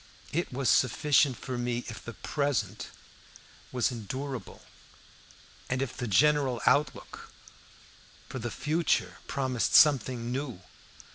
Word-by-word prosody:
It 170 +3 -1
was 130 0 -2
sufficient 130 +4 +3
for 130 -2 -5
me 120 0 -2
if 110 -2 -8
the 115 - -8
present 120 -10 -2 0.8
was 125 0 +1
endurable, 125 0 -6 1.1
and 130 - 0
if 135 -2 -3
the 125 - -4
general 140 +2 +3
outlook 140 0 0 1.0
for 130 +1 -6
the 120 +1 -3
future 155 +8 0
promised 130 -4 0
something 125 -4 +4
new. 130 -6 -4
130 Hz, 115 wpm, -29 LUFS, 120-140 Hz, 1.1 s, something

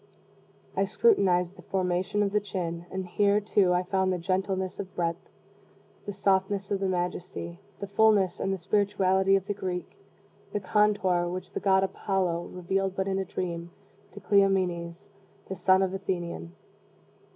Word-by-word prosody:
I - - +2
scrutinized 185 - +2
the - - -11
formation 185 +2 0
of 200 - 0
the 210 - +3
chin 175 -4 -4
and, 190 0 -4
here, 200 +3 +2
too, 205 -3 +2
I 180 0 +2
found 190 0 +1
the 185 - 0
gentleness 190 +1 -2
of 190 -2 -7
breadth, 170 -1 -2 0.8
the - - -2
softness 195 0 0
and 200 - +1
the 195 - 0
majesty, 180 -1 -3 0.2
the - - -3
fullness 200 -2 +3
and 195 - -1
the 195 - -1
spirituality, 190 0 +2
of 195 -1 0
the 205 - -2
Greek 185 -3 -5 0.6
the 205 - 0
contour 190 -3 +2
which 185 +1 -5
the - - -2
god 190 -1 +3
Apollo 185 -3 -1
revealed 190 +1 -1
but 190 0 -1
in 195 0 0
a 190 - -2
dream, 170 -2 -4 0.4
to 205 - -9
Cleomenes, 185 -2 +1 0.4
the 190 - -4
son 185 +1 +4
of 190 - 0
the 195 - -2
Athenian. 170 - -4
190 Hz, 165 wpm, -28 LUFS, 180-195 Hz, 0.8 s, son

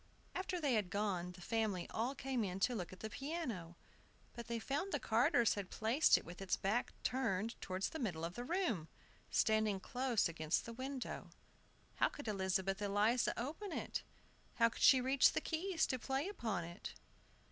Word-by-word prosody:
After 375 -1 -2
they 285 -5 +2
had 210 -5 +1
gone 185 -4 -1
the 180 - -13
family 215 -3 0
all 245 +5 -1
came 260 -3 -1
in 190 -1 -3
to 245 - +3
look 185 -7 -4
at 185 - -11
the 220 - -3
piano; 250 - -4 0.6
but 235 0 -7
they 235 0 -1
found 285 - -2
the 290 - 0
carters 230 0 +4
had 200 -3 -4
placed 230 +8 +4
it - - -7
with 175 +3 -9
its 195 - 0
back 215 +5 0
turned 230 -4 0
towards 185 +1 -2
the 320 - -6
middle 175 - -2
of 170 - -4
the 240 - -5
room, 265 - 0 0.4
standing 215 -3 +2
close 250 +1 +1
against 160 -1 0
the 230 - -6
window. 260 +2 -5 0.7
How - - +4
could 290 - -9
Elizabeth 195 -1 0
Eliza 210 +4 +2
open 315 - -4
it? - - -2 0.5
How 230 -1 +5
could - - -9
she 265 - +8
reach 265 +1 +5
the - - +2
keys 330 0 0
to 255 - -1
play 270 +6 -1
upon 225 - -2
it? 170 +3 -7
225 Hz, 180 wpm, -38 LUFS, 190-265 Hz, 0.7 s, she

